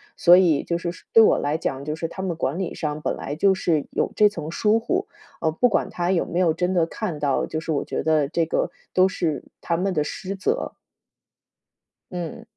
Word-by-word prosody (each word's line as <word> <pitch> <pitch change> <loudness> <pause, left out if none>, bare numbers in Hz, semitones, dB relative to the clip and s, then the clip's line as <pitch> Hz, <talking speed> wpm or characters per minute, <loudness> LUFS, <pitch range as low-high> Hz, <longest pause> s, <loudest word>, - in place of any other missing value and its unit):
所 175 0 +7
以 170 -6 +4
就 170 - -1
是 170 0 -3
说 - - -15
对 225 - +8
我 - - +5
来 145 +2 -1
讲， 135 -4 -3
就 150 - -2
是 165 +1 -3
他 190 - -7
们 185 -3 -2
管 145 +3 -2
理 190 - -3
上 150 0 -3
本 - - -1
来 145 - -5
就 195 +4 +4
是 160 -5 0
有 - - -1
这 210 - +6
层 160 -6 -6
疏 215 +5 +2
忽。 365 +12 -1 0.3
呃， 160 - +2
不 245 +11 +3
管 210 - 0
他 175 +1 -1
有 180 - +1
没 175 - -2
有 170 -3 +3
真 180 +3 -1
的 170 -2 +3
看 170 -3 -5
到， 145 -2 +1
就 155 - -4
是 160 0 -4
我 145 - 0
觉 - - -3
得 155 -3 +2
这 165 +1 +1
个 160 - 0 0.2
都 185 0 +5
是 160 -7 -2 0.2
他 170 - -1
们 190 +2 0
的 150 - +1
失 190 +5 -5
责。 445 - -2 1.4
嗯。 175 -3 -5
170 Hz, 245 characters per minute, -23 LUFS, 155-190 Hz, 1.4 s, 对